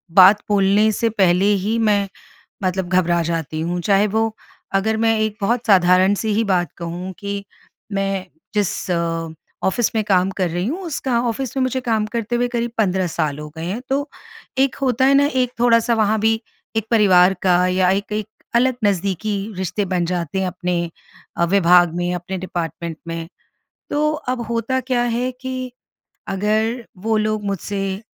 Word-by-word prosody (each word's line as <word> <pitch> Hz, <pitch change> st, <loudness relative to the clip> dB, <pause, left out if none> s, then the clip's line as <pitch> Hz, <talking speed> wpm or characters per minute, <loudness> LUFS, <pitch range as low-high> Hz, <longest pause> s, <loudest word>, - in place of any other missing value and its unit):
बात 195 Hz, +2 st, +8 dB
बोलने 205 Hz, +2 st, +4 dB
से 225 Hz, +2 st, 0 dB
पहले 190 Hz, -3 st, +3 dB, 0.2 s
ही 220 Hz, +3 st, 0 dB
मैं 205 Hz, -3 st, +2 dB, 0.6 s
मतलब 185 Hz, -1 st, -1 dB
घबरा 175 Hz, -2 st, +2 dB
जाती 160 Hz, -2 st, -3 dB
हूँ। 175 Hz, +2 st, -2 dB
चाहे 200 Hz, +3 st, +3 dB
वो 220 Hz, +1 st, 0 dB, 0.4 s
अगर 220 Hz, +3 st, +1 dB
मैं 225 Hz, 0 st, +2 dB
एक 215 Hz, -1 st, -1 dB
बहुत 235 Hz, +4 st, 0 dB
साधारण-सी 190 Hz, +2 st, +4 dB
ही 225 Hz, -, +2 dB
बात 180 Hz, -6 st, 0 dB
कहूँ 175 Hz, +2 st, -5 dB
कि 200 Hz, 0 st, -4 dB, 0.5 s
मैं 195 Hz, -1 st, -1 dB, 0.3 s
जिस 205 Hz, -2 st, -1 dB, 0.7 s
ऑफ़िस 215 Hz, +4 st, +1 dB
में 220 Hz, -, +2 dB
काम 190 Hz, -2 st, +2 dB
कर 180 Hz, -3 st, +1 dB
रही 175 Hz, +3 st, -2 dB
हूँ 320 Hz, -, -2 dB
उसका 265 Hz, -6 st, -1 dB
ऑफ़िस 255 Hz, +3 st, -3 dB
में 265 Hz, -, +2 dB
मुझे 255 Hz, 0 st, 0 dB
काम 220 Hz, -3 st, 0 dB
करते 235 Hz, +1 st, -1 dB
हुए 245 Hz, 0 st, +1 dB
करीब 240 Hz, -1 st, -2 dB
15 190 Hz, -3 st, +1 dB
साल 155 Hz, -3 st, -2 dB
हो 150 Hz, 0 st, -7 dB
गए 160 Hz, -, -5 dB
हैं। 200 Hz, +7 st, -3 dB
तो 285 Hz, +2 st, -1 dB, 0.5 s
एक 270 Hz, 0 st, +2 dB
होता 260 Hz, -1 st, +2 dB
है 275 Hz, -, +5 dB
न 275 Hz, -, +6 dB
एक 250 Hz, -1 st, 0 dB
थोड़ा-सा 235 Hz, -1 st, +4 dB
वहाँ 220 Hz, -1 st, +2 dB
भी 225 Hz, +1 st, +2 dB, 0.4 s
एक 220 Hz, -1 st, 0 dB
परिवार 190 Hz, -4 st, +5 dB
का 180 Hz, -1 st, +4 dB
या 185 Hz, 0 st, +2 dB
एक 200 Hz, +2 st, -1 dB
एक 215 Hz, 0 st, -2 dB, 0.3 s
अलग 255 Hz, +1 st, +3 dB
नज़दीकी 200 Hz, +1 st, 0 dB, 0.2 s
रिश्ते 190 Hz, +2 st, -2 dB
बन 180 Hz, -2 st, 0 dB
जाते 175 Hz, 0 st, -2 dB
हैं 190 Hz, -, 0 dB
अपने 175 Hz, -1 st, -2 dB, 0.5 s
अ, 170 Hz, -, +2 dB
विभाग 175 Hz, -2 st, +4 dB
में, 175 Hz, 0 st, -1 dB
अपने 180 Hz, +2 st, -4 dB
डिपार्टमेंट 170 Hz, -2 st, -4 dB
में। 165 Hz, 0 st, -5 dB, 0.6 s
तो 300 Hz, +1 st, +1 dB
अब 255 Hz, -5 st, -3 dB
होता 260 Hz, +3 st, 0 dB
क्या 250 Hz, -1 st, 0 dB
है 245 Hz, +1 st, 0 dB
कि 255 Hz, -1 st, -5 dB, 0.6 s
अगर 220 Hz, +4 st, 0 dB
वो 220 Hz, +3 st, 0 dB
लोग 215 Hz, 0 st, 0 dB
मुझसे 195 Hz, 0 st, -3 dB
200 Hz, 170 wpm, -20 LUFS, 180-230 Hz, 0.7 s, बात